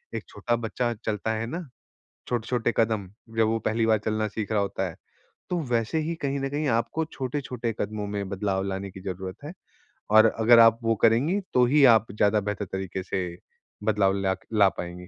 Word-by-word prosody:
एक - - -4
छोटा 120 - -1
बच्चा 120 +1 -2
चलता 110 +1 -1
है 110 +1 -2
ना, 170 +4 -5 0.6
छोटे-छोटे 120 0 0
कदम 110 -4 +1 0.3
जब 110 -1 +4
वो 115 0 +1
पहली 110 +1 0
बार 110 -1 +4
चलना 110 0 0
सीख 105 0 -4
रहा 105 - +2
होता 95 -1 -2
है 85 - -10 0.5
तो 180 - 0
वैसे 115 +6 +1
ही 160 +2 -2
कहीं 140 0 -1
न 135 - -1
कहीं 150 +2 -2
आपको 120 +7 0
छोटे-छोटे 125 -3 -3
कदमों 105 0 -3
में 100 -1 -3
बदलाव 95 0 -1
लाने 95 0 -4
की 95 - -11
ज़रूरत 95 0 -5
है 155 - -6 0.6
और 110 0 +8
अगर 115 +1 +7
आप 115 0 +6
वो 115 0 +2
करेंगी 130 - +4
तो 125 -1 +5
ही 145 +3 +4
आप 110 - +1
ज़्यादा 105 +1 +2
बेहतर 105 0 -3
तरीके 95 0 -5
से 95 0 -2 0.6
बदलाव 100 -2 +2
ला 95 -1 +1 0.2
ला 100 -3 +5
पाएँगे। 90 0 -7
110 Hz, 190 wpm, -26 LUFS, 100-120 Hz, 0.6 s, और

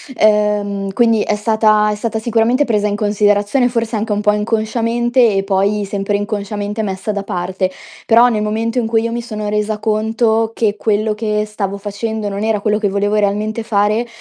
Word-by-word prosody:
ehm, 210 -2 +1
quindi 230 -1 +3
è 210 - 0
stata 215 0 +2
è - - -2
stata 220 +1 -3
sicuramente 235 +4 +2
presa 210 -5 0
in 205 - -1
considerazione 205 +3 +2
forse 230 -2 -2
anche 215 0 -1
un 205 - -1
po' 210 0 +3
inconsciamente 230 +2 +1
e 195 - +1
poi 200 +1 +1
sempre 200 0 -2
inconsciamente 205 +1 -3
messa 195 +1 -3
da 200 -1 -3
parte. 185 +1 -2 0.4
Però, 235 +2 +5
nel 215 -3 -1
momento 225 +3 -1
in 225 - -1
cui 225 0 +2
io 230 - -2
mi 235 - -3
sono 215 -3 -5
resa 210 0 -1
conto 220 +1 +1
che 215 -2 0
quello 215 0 0
che 210 -1 -1
stavo 200 -2 -4
facendo 210 +1 -4
non 200 +1 -4
era 220 -2 0
quello 210 0 +1
che 210 - +1
volevo 200 +1 0
realmente 210 +2 0
fare, 215 +1 0
210 Hz, 185 wpm, -17 LUFS, 205-225 Hz, 0.4 s, Però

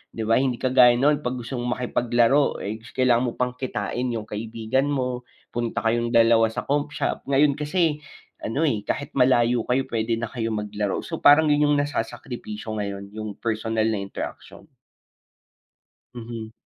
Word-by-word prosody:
'di 115 - -3
ba? 115 +2 +3
Hindi 130 -2 +1
kagaya 125 -1 +5
nun, 145 +4 +3
'pag 125 -3 -3
gusto 125 +1 -5
mong 120 0 -1
makipaglaro, 120 +2 +1
eh, 110 +2 -4 0.2
kailangan 125 -1 +3
mo 120 - -1
pang 125 0 0
kitain 125 0 -3
yung 115 -3 -3
kaibigan 110 +5 -2
mo, 125 -3 -2 0.2
punta 120 -1 -2
kayong 120 +1 0
dalawa 115 -1 +5
sa 110 - -4
comp 145 +1 -1
shop. - - -2
Ngayon 140 +1 +3
kasi 150 0 +1 0.4
ano, 125 +8 -3
eh, 105 -5 -3
kahit 140 0 -4
malayo 120 -2 +3
kayo, 130 +1 0
puwede 115 0 -1
na 115 0 -2
kayong 110 -3 -3
maglaro. 105 -1 -2
So, 165 - -5
parang 150 +2 +6
yun 150 0 +4
yung - - +3
nasasakripisyo 120 -5 -5
ngayon, 100 -1 -4
yung 110 0 -6
personal 110 -1 0
na 110 - 0
interaksyon. 100 0 -7 1.5
Mhm. 115 -2 -7
120 Hz, 160 wpm, -24 LUFS, 110-130 Hz, 1.5 s, parang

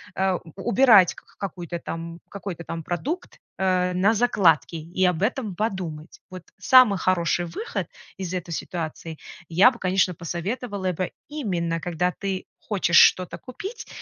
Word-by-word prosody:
а, 190 -1 +1
у 165 - -14 0.2
убирать 210 -6 +6
к - - -16
к - - -26
какую-то 175 -3 -5
там, 165 0 -6
какой-то 190 -4 -6
там 165 0 -6
продукт, 280 - -4 0.2
э, 185 -1 +1
на 190 +5 +3
закладки 195 -9 +3
и 170 +4 -1
об 180 -2 +1
этом 215 -2 -1
подумать. 175 -6 -4
Вот 185 -2 -8
самый 255 -6 +6
хороший 175 -2 +1
выход 175 - -4 0.3
из 185 -2 -5
этой 180 -2 -4
ситуации: 165 -1 -5 0.3
я 180 +9 +6
бы, 245 - -11
конечно, 185 0 +2
посоветовала 190 +3 -3
бы 180 +1 -3 0.2
именно, 175 - -2
когда 175 +1 -1
ты 195 -1 -4
хочешь 190 -5 +1
что-то 185 -1 +4
купить 395 - -8
185 Hz, 150 wpm, -24 LUFS, 170-205 Hz, 0.3 s, убирать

